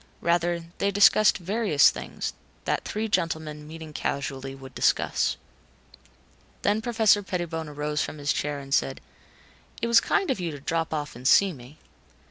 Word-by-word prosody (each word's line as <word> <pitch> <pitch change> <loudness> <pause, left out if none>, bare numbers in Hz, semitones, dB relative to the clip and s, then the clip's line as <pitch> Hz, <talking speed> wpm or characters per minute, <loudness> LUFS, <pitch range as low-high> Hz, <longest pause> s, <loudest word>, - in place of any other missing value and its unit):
Rather, 170 0 +1 0.2
they 200 - +2
discussed 205 +1 +5
various 190 -5 +3
things, - - -5 0.3
that - - 0
three 215 +1 -3
gentlemen, 160 -5 -2
meeting 160 -1 -9
casually, 135 -1 -3
would 135 -1 -12
discuss. - - +1 1.3
Then 210 +2 +2
Professor 220 -3 +3
Pettibone 170 -5 -4
arose 150 +1 -2
from - - -4
his 145 0 0
chair 145 0 -2
and 135 -1 -6
said, 65 - +1 0.8
"It - - -1
was 235 0 +6
kind 390 -7 +1
of 255 - -2
you 175 -2 -2
to 145 -2 -7
drop 165 +3 -2
off 150 -4 -3
and 125 +2 -3
see 195 +4 +5
me." 130 +2 -13
160 Hz, 155 wpm, -26 LUFS, 145-200 Hz, 1.3 s, was